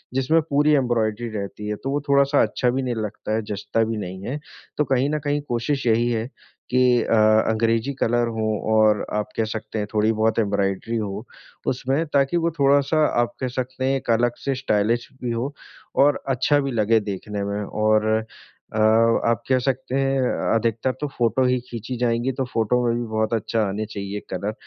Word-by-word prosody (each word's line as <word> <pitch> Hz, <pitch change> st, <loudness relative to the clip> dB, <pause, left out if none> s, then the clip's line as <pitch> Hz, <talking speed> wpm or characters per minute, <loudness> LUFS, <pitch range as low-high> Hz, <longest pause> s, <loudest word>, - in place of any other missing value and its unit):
जिसमे 135 Hz, +5 st, +3 dB
पूरी 150 Hz, +2 st, +3 dB
एम्ब्रॉयडरी 115 Hz, -1 st, -1 dB
रहती 100 Hz, +1 st, -6 dB
है, 105 Hz, -, -2 dB
तो 135 Hz, -, -6 dB
वो 145 Hz, +1 st, 0 dB
थोड़ा-सा 140 Hz, +1 st, +4 dB
अच्छा 125 Hz, -, 0 dB
भी 130 Hz, +2 st, 0 dB
नहीं 125 Hz, -2 st, -2 dB
लगता 110 Hz, -1 st, -4 dB
है 115 Hz, -, 0 dB
जचता 105 Hz, +2 st, 0 dB
भी 110 Hz, 0 st, -2 dB
नहीं 95 Hz, -1 st, -6 dB
है। 140 Hz, +4 st, -3 dB, 0.4 s
तो 150 Hz, -, +3 dB
कहीं 130 Hz, +2 st, +2 dB
न -, -, -1 dB
कहीं 145 Hz, 0 st, 0 dB
कोशिश 125 Hz, +3 st, -1 dB
यही 115 Hz, +2 st, +3 dB
है 115 Hz, 0 st, -1 dB, 0.4 s
कि 125 Hz, -1 st, +4 dB
अ, -, -, +1 dB, 0.3 s
अंग्रेजी 115 Hz, +4 st, +1 dB
कलर 120 Hz, +1 st, +2 dB
हो 110 Hz, -, 0 dB, 0.3 s
और 110 Hz, -1 st, +4 dB
आप 105 Hz, 0 st, -1 dB
कह 110 Hz, -, +2 dB
सकते 110 Hz, 0 st, -5 dB
हैं 105 Hz, -, -2 dB
थोड़ी-बहुत 110 Hz, +1 st, +2 dB
एम्ब्रॉयडरी 100 Hz, +1 st, 0 dB
हो 105 Hz, +1 st, -4 dB, 0.4 s
उसमें 135 Hz, +5 st, 0 dB
ताकि 140 Hz, +4 st, +3 dB
वो 170 Hz, 0 st, +1 dB
थोड़ा-सा 140 Hz, +2 st, +4 dB, 0.2 s
आप 120 Hz, 0 st, -2 dB
कह 130 Hz, -, 0 dB
सकते 130 Hz, +1 st, -3 dB
हैं 135 Hz, +1 st, +2 dB
एक 130 Hz, -, -9 dB
अलग 120 Hz, +1 st, +2 dB
से 135 Hz, -1 st, 0 dB
स्टाइलिश 115 Hz, -1 st, 0 dB
भी 120 Hz, -, -1 dB
हो, 125 Hz, +5 st, -2 dB, 0.4 s
और 145 Hz, +1 st, +3 dB
अच्छा 135 Hz, +3 st, +2 dB
भी 135 Hz, -, -2 dB
लगे 110 Hz, -1 st, +3 dB
देखने 100 Hz, +1 st, -5 dB
में 100 Hz, +1 st, -2 dB
और 110 Hz, +1 st, +1 dB, 0.6 s
अ, -, -, -3 dB, 0.5 s
आप 115 Hz, -, +1 dB
कह 130 Hz, -, +4 dB
सकते 130 Hz, 0 st, -2 dB
हैं 135 Hz, 0 st, +1 dB, 0.4 s
अधिकतर 115 Hz, +3 st, 0 dB
तो 150 Hz, -, -1 dB
फोटो 120 Hz, +2 st, +2 dB
ही 125 Hz, 0 st, +2 dB
खींची 120 Hz, +2 st, -5 dB
जाएँगी 120 Hz, +2 st, +1 dB
तो 130 Hz, +1 st, -2 dB
फोटो 120 Hz, +2 st, +1 dB
में 115 Hz, -, +1 dB
भी 120 Hz, -, -3 dB
बहुत 110 Hz, +1 st, -1 dB
अच्छा 110 Hz, +1 st, 0 dB
आने 105 Hz, +2 st, -3 dB
चाहिए 100 Hz, -1 st, -5 dB
कलर 100 Hz, +3 st, -2 dB
115 Hz, 190 wpm, -23 LUFS, 110-130 Hz, 0.6 s, थोड़ा-सा